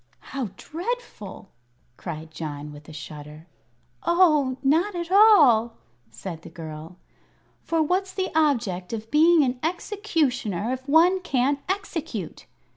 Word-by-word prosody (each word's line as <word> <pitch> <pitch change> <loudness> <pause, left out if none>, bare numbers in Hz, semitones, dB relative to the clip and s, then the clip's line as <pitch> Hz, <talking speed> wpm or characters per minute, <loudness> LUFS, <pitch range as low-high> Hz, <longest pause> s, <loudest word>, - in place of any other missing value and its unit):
"How 265 -6 -2
dreadful!" 335 - -6 0.4
cried 160 0 -7
John, 150 -1 -6
with 145 +1 -13
a - - -9
shudder. 150 +1 -10 0.6
"Oh, 305 -7 +3
not 335 +9 +2
at 345 0 -4
all!" 290 - +6 0.3
said 160 +9 -8
the 170 - -11
girl. 160 0 -9 0.6
"For 330 -1 +1
what's 375 +4 0
the 375 0 -3
object 235 - 0
of 220 0 -6
being 320 +1 +5
an 250 -1 -1
Executioner 295 - -1
if 260 +2 -7
one 345 +5 +5
can't 280 -5 0
execute?" 325 - -4
265 Hz, 120 wpm, -25 LUFS, -, 0.6 s, all